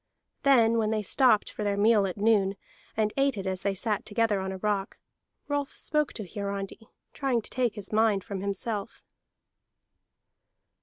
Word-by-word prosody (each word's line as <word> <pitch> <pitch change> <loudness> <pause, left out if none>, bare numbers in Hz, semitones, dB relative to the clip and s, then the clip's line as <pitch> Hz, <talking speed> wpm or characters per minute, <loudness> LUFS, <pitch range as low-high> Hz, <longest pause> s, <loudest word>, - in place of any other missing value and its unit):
Then 230 -4 +4
when 215 -1 +1
they 215 -1 0
stopped 240 0 +3
for 215 - -5
their 200 -1 0
meal 210 -1 +4
at 185 - -5
noon, 205 -2 +3 0.4
and 215 -1 +1
ate 275 -3 +2
it 195 - -4
as 190 -1 -2
they 200 -1 -1
sat 210 +1 -1
together 215 -1 +1
on 190 0 -3
a 190 - -5
rock, 200 0 -2 0.5
Rolf 285 -1 -2
spoke 300 -2 0
to 210 -4 -6
Hiarandi, 200 +2 -5 0.3
trying 255 -5 0
to - - -10
take 245 -3 0
his 205 -3 -8
mind 215 -3 +3
from 195 -2 -5
himself. 200 +2 -4
210 Hz, 165 wpm, -28 LUFS, 200-230 Hz, 0.5 s, Then